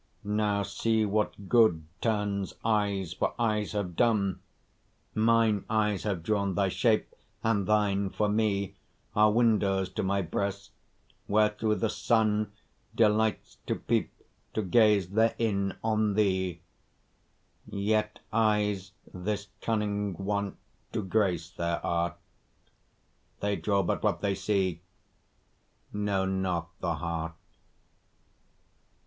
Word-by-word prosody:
Now 105 Hz, 0 st, +1 dB
see 110 Hz, +1 st, +1 dB
what 105 Hz, -1 st, -1 dB
good 110 Hz, -10 st, +4 dB, 0.2 s
turns 105 Hz, -3 st, -1 dB
eyes 100 Hz, -5 st, +1 dB
for -, -, -1 dB
eyes 110 Hz, -3 st, 0 dB
have 95 Hz, -5 st, -3 dB
done: 105 Hz, -5 st, +2 dB, 0.7 s
Mine 110 Hz, -2 st, +3 dB
eyes 105 Hz, -2 st, +1 dB
have 95 Hz, -6 st, -2 dB
drawn 100 Hz, -1 st, 0 dB
thy 95 Hz, +1 st, +2 dB
shape, 110 Hz, +3 st, +1 dB, 0.3 s
and 105 Hz, -4 st, +1 dB
thine 100 Hz, -2 st, +2 dB
for 105 Hz, +2 st, 0 dB
me 105 Hz, -2 st, 0 dB, 0.4 s
Are 105 Hz, 0 st, +5 dB
windows 105 Hz, -5 st, +2 dB
to -, -, -3 dB
my 100 Hz, 0 st, 0 dB
breast, 100 Hz, +4 st, -3 dB, 0.6 s
where 105 Hz, +1 st, +4 dB
through 105 Hz, +1 st, 0 dB
the 110 Hz, -, 0 dB
sun 110 Hz, -3 st, +1 dB, 0.4 s
Delights 110 Hz, -1 st, +1 dB
to -, -, +1 dB
peep, -, -, 0 dB, 0.4 s
to 110 Hz, -, 0 dB
gaze 105 Hz, -1 st, +4 dB
therein 110 Hz, -2 st, +1 dB
on 110 Hz, -2 st, +1 dB
thee; 95 Hz, -4 st, +1 dB, 1.1 s
Yet 105 Hz, +1 st, -1 dB
eyes 105 Hz, -3 st, +1 dB, 0.2 s
this 100 Hz, +2 st, -3 dB
cunning 105 Hz, -3 st, -1 dB
want 100 Hz, 0 st, -2 dB, 0.4 s
to -, -, -1 dB
grace 90 Hz, -4 st, 0 dB
their 85 Hz, -1 st, -2 dB
art, 85 Hz, -1 st, 0 dB, 1.2 s
They 100 Hz, 0 st, 0 dB
draw 100 Hz, -1 st, +1 dB
but -, -, -1 dB
what -, -, 0 dB
they 100 Hz, -1 st, +1 dB
see, 95 Hz, -3 st, 0 dB, 1.1 s
know 100 Hz, -2 st, 0 dB
not 95 Hz, -3 st, -1 dB
the 85 Hz, -2 st, -1 dB
heart. 80 Hz, 0 st, -3 dB
105 Hz, 115 wpm, -29 LUFS, 95-110 Hz, 1.2 s, Are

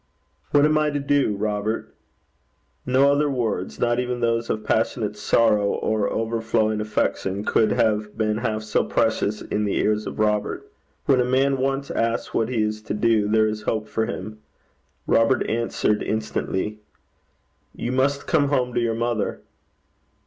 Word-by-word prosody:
'What 145 Hz, 0 st, +4 dB
am 155 Hz, 0 st, +3 dB
I 150 Hz, 0 st, +2 dB
to 145 Hz, -1 st, -2 dB
do, 140 Hz, -6 st, +1 dB
Robert?' 105 Hz, +1 st, -2 dB, 0.9 s
No 135 Hz, +2 st, +4 dB
other 145 Hz, +1 st, +2 dB
words, 105 Hz, -, -2 dB
not 120 Hz, 0 st, +1 dB
even 125 Hz, 0 st, -2 dB
those 115 Hz, 0 st, 0 dB
of 110 Hz, -, -2 dB
passionate 110 Hz, -1 st, 0 dB
sorrow, 105 Hz, 0 st, +2 dB
or 110 Hz, -2 st, 0 dB
overflowing 110 Hz, -1 st, 0 dB
affection, 105 Hz, -1 st, -1 dB
could 110 Hz, -, +2 dB
have 105 Hz, -1 st, 0 dB
been 110 Hz, -1 st, 0 dB
half 110 Hz, -2 st, -2 dB
so 110 Hz, -, +1 dB
precious 110 Hz, -2 st, 0 dB
in 105 Hz, -, -2 dB
the 100 Hz, -, -1 dB
ears 105 Hz, 0 st, 0 dB
of -, -, -6 dB
Robert. 105 Hz, -1 st, 0 dB, 0.4 s
When 135 Hz, -2 st, +4 dB
a -, -, +3 dB
man 135 Hz, +2 st, +2 dB
once 135 Hz, +1 st, -1 dB
asks 115 Hz, 0 st, -1 dB
what 115 Hz, -, 0 dB
he 115 Hz, -4 st, 0 dB
is 110 Hz, 0 st, -2 dB
to 105 Hz, -, -4 dB
do, 110 Hz, -1 st, +2 dB
there 110 Hz, +1 st, +3 dB
is 110 Hz, 0 st, -3 dB
hope 110 Hz, -1 st, -2 dB
for 110 Hz, 0 st, -1 dB
him. 110 Hz, -1 st, -6 dB, 0.7 s
Robert 115 Hz, +3 st, +2 dB
answered 115 Hz, -2 st, 0 dB
instantly, 105 Hz, -1 st, -2 dB, 1.0 s
'You 120 Hz, -, -3 dB
must 140 Hz, +2 st, +1 dB
come 145 Hz, -3 st, +2 dB
home 125 Hz, -3 st, 0 dB
to 120 Hz, -, +1 dB
your 115 Hz, -1 st, 0 dB
mother.' 115 Hz, -2 st, -2 dB
110 Hz, 160 wpm, -23 LUFS, 105-125 Hz, 1.0 s, What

